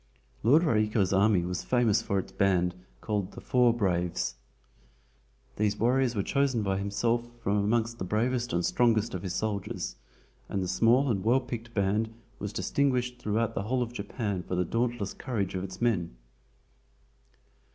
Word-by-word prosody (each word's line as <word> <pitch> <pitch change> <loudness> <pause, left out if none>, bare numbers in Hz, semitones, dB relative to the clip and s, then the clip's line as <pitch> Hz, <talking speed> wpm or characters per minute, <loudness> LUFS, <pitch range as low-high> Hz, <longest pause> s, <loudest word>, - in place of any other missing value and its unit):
Lord 145 +9 +5
Raiko's 105 - +2
army 100 -2 +4
was 90 0 -3
famous 120 -5 +2
for 100 - -1
its 95 - -3
band 90 -2 +2 0.3
called 105 -4 -2
"The - - -9
Four 125 -1 +3
Braves." 90 - 0 1.2
These 105 -1 +1
warriors 125 +2 +2
were 100 - 0
chosen 140 -4 +1
by 95 -1 0
himself 115 +4 0
from 100 +1 +1
amongst 115 +3 0
the - - -2
bravest 120 +5 0
and 85 0 0
strongest 115 -2 +2
of 90 - -3
his 95 0 -4
soldiers, 100 - -3 0.5
and 95 - -1
the - - -2
small 120 +8 +3
and 95 -4 -1
well 120 +4 +4
picked 120 -2 -7
band 105 +3 +1 0.3
was 105 0 -4
distinguished 125 -1 0
throughout 115 0 0
the - - -2
whole 125 +5 0
of 120 0 -7
Japan 100 -3 -3
for 90 - -4
the 90 0 +1
dauntless 115 0 -1
courage 105 -8 -3
of 95 -1 -3
its 95 -1 -7
men. 95 - 0
110 Hz, 160 wpm, -29 LUFS, 95-120 Hz, 1.2 s, Lord